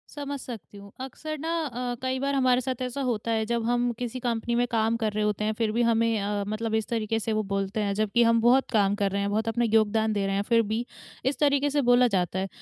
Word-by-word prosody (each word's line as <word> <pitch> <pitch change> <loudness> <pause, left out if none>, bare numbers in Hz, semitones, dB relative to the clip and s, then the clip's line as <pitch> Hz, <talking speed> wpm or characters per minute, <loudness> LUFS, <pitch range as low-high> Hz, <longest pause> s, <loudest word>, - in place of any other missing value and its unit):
समझ 285 -1 -4
सकती 215 - -9
हूँ, 200 0 -12
अक्सर 310 +4 -6
ना 320 +3 -4 0.2
अ, 245 -2 -3
कई 260 0 -1
बार 280 +1 -1
हमारे 255 -2 +3
साथ 255 0 -4
ऐसा 255 +2 -3
होता 230 -3 -1
है 220 -1 +1
जब 235 +1 -1
हम 245 +1 +1
किसी 245 +1 -4
कंपनी 235 -1 -1
में 245 - +2
काम 225 0 +1
कर 220 -2 -1
रहे 215 0 0
होते 210 0 -1
हैं 215 - 0
फिर 220 0 -1
भी 235 +2 0
हमें 230 -1 +2
अ, 205 0 -1
मतलब 220 +1 -2
इस 220 -1 -1
तरीके 225 -1 -1
से 225 0 -2
वो 215 0 0
बोलते 195 +2 -1
हैं, 200 -1 0
जबकि 215 +3 +2
हम 230 0 +3
बहुत 250 +3 +4
काम 205 -3 +3
कर 200 -2 0
रहे 200 +1 -1
हैं, 200 - -1
बहुत 220 +2 -1
अपना 235 +1 +1
योगदान 220 0 +3
दे 200 -1 0
रहे 195 0 -1
हैं 200 - +1
फिर 230 -1 +5
भी, 230 +2 -1 0.4
इस 265 0 0
तरीके 285 -1 +3
से 285 0 +1
बोला 245 0 +6
जाता 190 -3 0
है। 190 - -2
230 Hz, 260 wpm, -26 LUFS, 215-245 Hz, 0.4 s, बोला